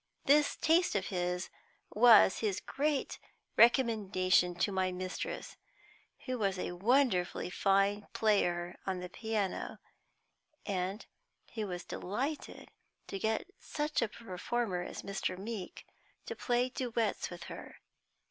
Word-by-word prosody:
This 295 Hz, +1 st, +4 dB
taste 335 Hz, -1 st, +3 dB
of 195 Hz, -2 st, 0 dB
his 180 Hz, -1 st, -2 dB, 0.4 s
was 225 Hz, -3 st, +7 dB
his 205 Hz, -4 st, 0 dB
great 290 Hz, 0 st, -1 dB, 0.4 s
recommendation 200 Hz, -7 st, +4 dB
to 190 Hz, +4 st, 0 dB
my 190 Hz, -1 st, 0 dB
mistress, 185 Hz, +1 st, -5 dB, 0.7 s
who 255 Hz, -2 st, -2 dB
was 195 Hz, -3 st, 0 dB
a 180 Hz, -, -3 dB
wonderfully 190 Hz, -2 st, +1 dB
fine 195 Hz, +2 st, +2 dB
player 175 Hz, -5 st, +1 dB
on 190 Hz, -1 st, -1 dB
the 180 Hz, 0 st, -6 dB
piano, 215 Hz, -1 st, -2 dB, 0.9 s
and 195 Hz, +2 st, -2 dB, 0.5 s
who 220 Hz, -3 st, -3 dB
was 180 Hz, -2 st, -5 dB
delighted 265 Hz, +11 st, -4 dB, 0.3 s
to 195 Hz, -, -5 dB
get 220 Hz, -, -1 dB
such 300 Hz, -2 st, -2 dB
a 230 Hz, -, +2 dB
performer 215 Hz, -1 st, -3 dB
as 175 Hz, -, -6 dB
Mr. 195 Hz, -2 st, -3 dB
Meeke 200 Hz, -1 st, -6 dB, 0.4 s
to -, -, -5 dB
play 245 Hz, 0 st, +1 dB
duets 235 Hz, -4 st, -1 dB
with 175 Hz, -1 st, -8 dB
her. -, -, -9 dB
205 Hz, 120 wpm, -33 LUFS, 185-240 Hz, 0.9 s, was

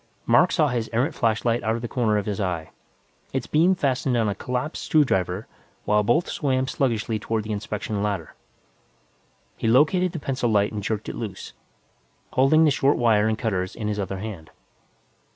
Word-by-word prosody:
Mac -, -, +4 dB
saw 155 Hz, -5 st, +2 dB
his 120 Hz, -3 st, -2 dB
errant 130 Hz, +8 st, +1 dB
flashlight 115 Hz, 0 st, +1 dB
out 110 Hz, +3 st, 0 dB
of 115 Hz, -, -5 dB
the -, -, -2 dB
corner 110 Hz, -3 st, +1 dB
of 105 Hz, -, -2 dB
his 105 Hz, -1 st, -3 dB
eye, 90 Hz, -4 st, -3 dB, 0.6 s
its -, -, -1 dB
beam 170 Hz, +5 st, +3 dB
fastened 130 Hz, -4 st, 0 dB
on 115 Hz, -2 st, +2 dB
a 100 Hz, -, 0 dB
collapsed 125 Hz, +9 st, -4 dB
screw 155 Hz, -3 st, +4 dB
driver 95 Hz, -2 st, -1 dB, 0.4 s
while 105 Hz, 0 st, +3 dB
both 120 Hz, +11 st, +2 dB
swam 130 Hz, -3 st, 0 dB
sluggishly 115 Hz, -5 st, -1 dB
toward 110 Hz, +1 st, -2 dB
the 110 Hz, -, -6 dB
inspection 105 Hz, 0 st, -3 dB
ladder. 100 Hz, -6 st, -3 dB, 1.2 s
He -, -, -2 dB
located 155 Hz, +9 st, +3 dB
the 165 Hz, -, -4 dB
pencil 130 Hz, -4 st, -1 dB
light 105 Hz, -2 st, +2 dB
and 105 Hz, -1 st, -4 dB
jerked 105 Hz, +1 st, -3 dB
it -, -, -4 dB
loose, 105 Hz, -5 st, -6 dB, 0.8 s
holding 155 Hz, +5 st, +5 dB
the 150 Hz, -, +4 dB
short 140 Hz, +1 st, +2 dB
wire 110 Hz, -3 st, +3 dB
and 110 Hz, -1 st, 0 dB
cutters 95 Hz, -6 st, -2 dB
in 110 Hz, -2 st, -4 dB
his 105 Hz, 0 st, -2 dB
other 95 Hz, -1 st, -3 dB
hand. 95 Hz, -6 st, -7 dB
115 Hz, 185 wpm, -24 LUFS, 105-130 Hz, 1.2 s, holding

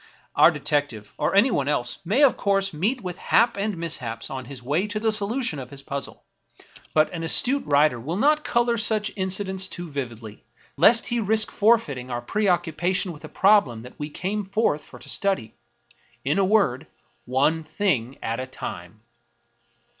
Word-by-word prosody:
Our -, -, +7 dB
detective, 145 Hz, -8 st, -2 dB
or -, -, 0 dB
anyone 200 Hz, -, +3 dB
else, 125 Hz, -5 st, -1 dB
may 215 Hz, -, +2 dB
of 275 Hz, -, +5 dB
course 195 Hz, -2 st, 0 dB
meet 215 Hz, -, -1 dB
with 180 Hz, -2 st, -6 dB
haps 230 Hz, -2 st, +2 dB
and 205 Hz, -2 st, -2 dB
mishaps 125 Hz, -9 st, -4 dB
on 130 Hz, -1 st, -5 dB
his 125 Hz, 0 st, -9 dB
way 155 Hz, +10 st, 0 dB
to 210 Hz, +1 st, -3 dB
the 220 Hz, 0 st, +1 dB
solution 215 Hz, -, -2 dB
of 125 Hz, -2 st, -8 dB
his 140 Hz, -1 st, -8 dB
puzzle; 140 Hz, 0 st, -6 dB, 0.7 s
but 155 Hz, +2 st, +3 dB
an 170 Hz, -, -4 dB
astute 255 Hz, +11 st, +3 dB
writer 145 Hz, -3 st, +3 dB
will 155 Hz, +10 st, -4 dB
not 300 Hz, +7 st, +3 dB
II -, -, -9 dB
American 240 Hz, 0 st, +2 dB
Mystery 235 Hz, -, -1 dB
Stories 220 Hz, -, +4 dB
color 220 Hz, -1 st, +1 dB
such 210 Hz, -, -5 dB
incidents 190 Hz, 0 st, 0 dB
too 175 Hz, -2 st, -7 dB
vividly, 115 Hz, -6 st, -7 dB, 0.3 s
lest 225 Hz, +10 st, +5 dB
he 240 Hz, -, 0 dB
risk 215 Hz, 0 st, +2 dB
forfeiting 185 Hz, -, +1 dB
our 120 Hz, -, -3 dB
preoccupation 180 Hz, -, 0 dB
with 150 Hz, -, -13 dB
the -, -, -10 dB
problem 190 Hz, -, +3 dB
that 125 Hz, -, -13 dB
we 150 Hz, 0 st, -4 dB
came 200 Hz, +7 st, -3 dB
forth 195 Hz, -6 st, 0 dB
for -, -, -14 dB
to -, -, -14 dB
study. 190 Hz, -, -1 dB, 0.7 s
In 145 Hz, +8 st, +1 dB
a -, -, +3 dB
word, 175 Hz, -, +1 dB, 0.4 s
One 145 Hz, +6 st, +1 dB
thing 150 Hz, -, -1 dB
at 115 Hz, +2 st, -2 dB
a 130 Hz, -, -4 dB
time 95 Hz, -4 st, -8 dB
170 Hz, 185 wpm, -24 LUFS, 135-210 Hz, 0.7 s, Our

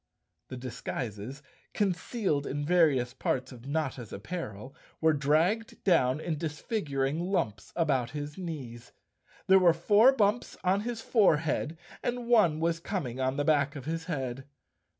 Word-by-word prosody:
The 130 Hz, -, -7 dB
disguises, 125 Hz, 0 st, -5 dB, 0.3 s
concealed 190 Hz, -, 0 dB
in 145 Hz, +1 st, -3 dB
various 145 Hz, -8 st, +3 dB
parts 130 Hz, 0 st, -2 dB
of 125 Hz, 0 st, -11 dB
Notta's 140 Hz, -6 st, -3 dB
apparel, 130 Hz, -, -6 dB, 0.3 s
were 160 Hz, -1 st, +4 dB
dragged 160 Hz, +10 st, +1 dB
down 150 Hz, -7 st, +3 dB
in 160 Hz, -2 st, -3 dB
disfiguring 150 Hz, -, -2 dB
lumps 140 Hz, -, -2 dB
about 135 Hz, -8 st, +1 dB
his 145 Hz, +2 st, -6 dB
knees. 130 Hz, -10 st, -7 dB, 0.5 s
There 190 Hz, 0 st, +6 dB
were 175 Hz, -3 st, +6 dB
four 205 Hz, +9 st, +5 dB
bumps 225 Hz, -2 st, 0 dB
on 190 Hz, +2 st, +3 dB
his 230 Hz, 0 st, -4 dB
forehead 160 Hz, -, +2 dB, 0.2 s
and 245 Hz, 0 st, -2 dB
one 210 Hz, -10 st, +4 dB
was 165 Hz, 0 st, 0 dB
coming 150 Hz, -, -4 dB
on 130 Hz, +1 st, 0 dB
the 145 Hz, -, 0 dB
back 145 Hz, -2 st, +2 dB
of 135 Hz, -3 st, -7 dB
his 165 Hz, +1 st, -3 dB
head. 135 Hz, -6 st, -4 dB
155 Hz, 140 wpm, -29 LUFS, 130-180 Hz, 0.5 s, There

